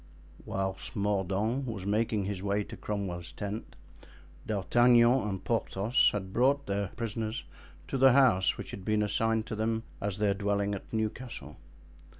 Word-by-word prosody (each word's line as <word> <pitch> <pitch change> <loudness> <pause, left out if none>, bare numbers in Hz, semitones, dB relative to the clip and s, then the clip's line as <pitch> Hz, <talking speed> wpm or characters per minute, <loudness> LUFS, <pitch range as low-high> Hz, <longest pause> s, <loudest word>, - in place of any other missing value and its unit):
Whilst 95 0 -3
Mordaunt 105 +5 0
was 105 -5 -5
making 105 0 +1
his 95 -1 -3
way 100 +1 0
to - - -9
Cromwell's 90 -5 -4
tent, 100 +6 -6 0.7
D'Artagnan 120 +4 +4
and 95 -2 -4
Porthos 115 +1 +2
had 95 -2 -4
brought 140 +3 +3
their 100 0 -1
prisoners 115 -1 -3 0.4
to 135 - -2
the 135 -1 +7
house 120 -9 +4
which - - -7
had 95 - -7
been 105 +1 +1
assigned 110 +2 +1
to 110 - -4
them 110 +1 -1 0.2
as 100 -1 -2
their 105 -1 +2
dwelling 100 0 0
at 100 - -7
Newcastle. 110 - -4
105 Hz, 150 wpm, -30 LUFS, 100-115 Hz, 0.7 s, the